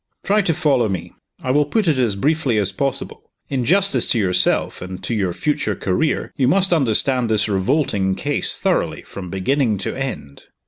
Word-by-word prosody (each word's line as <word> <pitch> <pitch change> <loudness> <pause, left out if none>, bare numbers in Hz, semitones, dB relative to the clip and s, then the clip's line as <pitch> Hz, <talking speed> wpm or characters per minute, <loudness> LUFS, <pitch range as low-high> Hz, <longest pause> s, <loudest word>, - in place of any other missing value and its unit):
Try 210 +2 +2
to 175 -4 0
follow 140 -9 +1
me. 95 -3 -5 0.3
I 130 - 0
will 145 +3 +3
put 205 +6 0
it 150 -5 +2
as 115 -5 +1
briefly 140 +1 0
as 100 -2 +2
possible. 135 +7 -4 0.2
In 130 -3 -1
justice 195 +5 +2
to - - +1
yourself, 95 -4 +1
and 90 0 -8
to - - -2
your 100 -5 0
future 110 - -1
career, 95 - -1
you 130 -4 +1
must 185 +5 +3
understand 130 -3 +2
this 110 -1 +2
revolting 100 -2 0
case - - +1
thoroughly, - - -1
from 90 -2 -9
beginning 110 +4 0
to 95 - -4
end." 130 - -6
125 Hz, 180 wpm, -20 LUFS, 100-150 Hz, 0.3 s, will